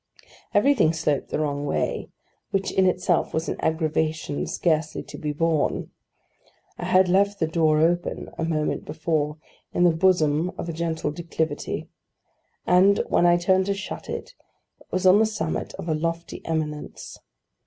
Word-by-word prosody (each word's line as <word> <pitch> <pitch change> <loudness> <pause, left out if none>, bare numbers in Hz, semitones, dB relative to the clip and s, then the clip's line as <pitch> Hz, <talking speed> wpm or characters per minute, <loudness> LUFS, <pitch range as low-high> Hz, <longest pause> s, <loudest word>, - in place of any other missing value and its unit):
Everything 205 - +4
sloped 150 -3 -1
the - - -1
wrong 145 -2 -1
way: 145 - -2 0.4
which 195 -1 -1
in 190 -1 +3
itself 180 -2 +1
was 160 +1 -1
an - - -1
aggravation 160 -2 -1
scarcely 160 -2 0
to - - -11
be 150 -3 -3
borne. 160 0 0 0.9
I - - -3
had 185 0 +4
left 200 +2 +2
the 160 - +2
door 160 -1 +2
open, 175 +2 0
a - - -3
moment 155 -2 -1
before, 155 -1 -1 0.4
in 175 - +3
the 175 - +6
bosom 165 -1 +2
of - - -5
a 170 - -3
gentle 160 -2 -2
declivity, 160 -1 -3 0.8
and, 190 +3 +5
when 175 - +4
I 175 0 +5
turned 185 +2 +2
to 200 - +1
shut 195 - -7
it, - - -5 0.5
it - - -21
was 185 0 -1
on 185 +2 +7
the 220 - +5
summit 165 -7 -3
of - - -7
a 160 - +1
lofty 165 +2 -3
eminence. 155 -2 -4
165 Hz, 160 wpm, -24 LUFS, 155-180 Hz, 0.9 s, on